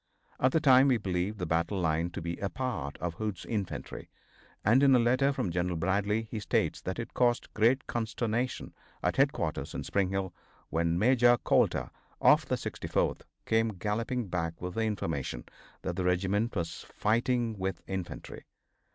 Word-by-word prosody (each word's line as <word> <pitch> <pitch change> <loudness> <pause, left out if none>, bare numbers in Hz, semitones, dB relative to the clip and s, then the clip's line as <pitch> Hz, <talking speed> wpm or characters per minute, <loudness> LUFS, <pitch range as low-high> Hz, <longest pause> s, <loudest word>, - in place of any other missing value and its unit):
At 130 - +3
the 160 - +3
time 135 -3 +6
we 130 -3 +4
believed 95 0 -2
the 90 - -3
battle 85 +4 0
line 80 0 +1
to 85 - -6
be 85 0 -3
a 100 - -2
part 95 - -3
of 85 -1 -3
Hood's 105 +1 -4
infantry, 100 -5 -4 0.6
and 115 +6 +5
in 135 -2 +6
a - - +7
letter 130 +4 +3
from 100 -10 -2
General 90 +1 -1
Bradley 100 +5 +1
he 110 0 -6
states 105 - 0
that 95 - -4
it 115 - -5
caused 120 -1 +1
great 120 +5 +3
consternation 120 +1 -2 0.3
at - - 0
headquarters - - 0
in - - -3
Spring 100 -2 0
Hill 95 -2 -2 0.4
when 85 +1 +1
Major 120 +3 +5
Coulter, - - +1 0.3
of - - +5
the - - +1
64th, - - -2 0.2
came 110 0 +2
galloping 110 +4 -2
back 85 -2 -3
with 90 0 -5
the 110 +2 0
information 80 - -3 0.4
that - - -2
the 95 - -1
regiment 95 +5 +1
was 85 -3 -3
fighting 115 0 0
with 95 -2 -3
infantry. 95 -2 -6
105 Hz, 170 wpm, -30 LUFS, 90-120 Hz, 0.6 s, a